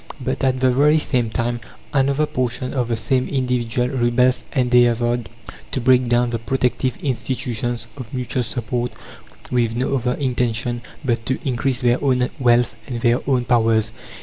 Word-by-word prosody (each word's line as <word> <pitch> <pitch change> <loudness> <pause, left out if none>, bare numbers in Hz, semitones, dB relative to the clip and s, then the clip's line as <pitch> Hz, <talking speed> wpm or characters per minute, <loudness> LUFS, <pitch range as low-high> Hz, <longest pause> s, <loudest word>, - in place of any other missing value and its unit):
But 130 +1 -3
at 130 -1 +2
the 130 -1 +4
very 150 +4 +4
same 125 -6 0
time, 120 +2 -1 0.3
another 140 +2 +2
portion 125 -2 -2
of 125 -4 0
the 120 - 0
same 130 +3 0
individual 125 -2 0
rebels 125 -1 +2
endeavoured 120 -3 +2 0.4
to - - 0
break 125 0 +3
down 120 0 +2
the 115 - -2
protective 125 +1 -1
institutions 120 -3 -2
of 130 -5 -9
mutual 125 0 -2
support, 120 0 -2 0.6
with 115 -2 +1
no 130 +3 0
other 125 0 -1
intention 120 -3 -1 0.2
but 115 -2 0
to 130 - 0
increase 130 0 0
their 120 +1 +2
own 125 -2 +2
wealth 120 -3 +3
and 120 -2 -4
their 120 +1 +3
own 125 -2 +2
powers. 115 -2 +2
125 Hz, 155 wpm, -21 LUFS, 120-130 Hz, 0.6 s, the